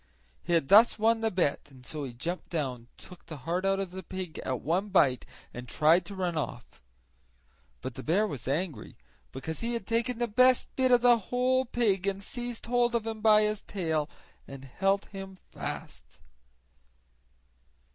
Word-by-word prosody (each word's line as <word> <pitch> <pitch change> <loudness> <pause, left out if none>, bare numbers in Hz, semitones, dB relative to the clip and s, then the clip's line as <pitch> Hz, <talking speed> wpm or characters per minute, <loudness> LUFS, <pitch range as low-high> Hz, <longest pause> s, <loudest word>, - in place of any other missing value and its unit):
He 175 - -2
had 165 -5 +2
thus 220 +4 +7
won 225 +1 +3
the 225 - +2
bet, 175 -9 0
and 130 -2 -16
so 150 0 -5
he 130 - -6
jumped 165 +10 -5
down, 130 -8 -3
took 180 -2 -14
the 155 - -7
heart 175 +3 -1
out 195 0 +2
of 195 -2 -3
the 190 +1 -6
pig 185 -4 -6
at 130 -2 -3
one 180 +8 0
bite, 135 -10 +3 0.3
and 125 +1 -8
tried 170 +3 +3
to 200 - -7
run 180 -3 -2
off. 125 -5 -5 1.0
But 130 - -5
the 130 - -7
bear 180 +10 +2
was 140 - -6
angry, 145 - -3 0.3
because 155 +5 -5
he 235 +1 -2
had 230 - -4
taken 230 +1 0
the 240 0 0
best 255 +3 +3
bit 260 -1 +2
of 245 -1 +5
the 240 -1 +6
whole 255 +1 +2
pig, 205 -6 0
and 195 0 -2
seized 240 +2 -5
hold 240 0 +1
of 230 -2 0
him 220 -1 -5
by 215 -1 +6
his 210 0 -1
tail 160 -5 -2 0.4
and 135 0 -9
held 195 +9 0
him 195 -1 -9
fast. - - -7
190 Hz, 180 wpm, -29 LUFS, 155-225 Hz, 1.0 s, thus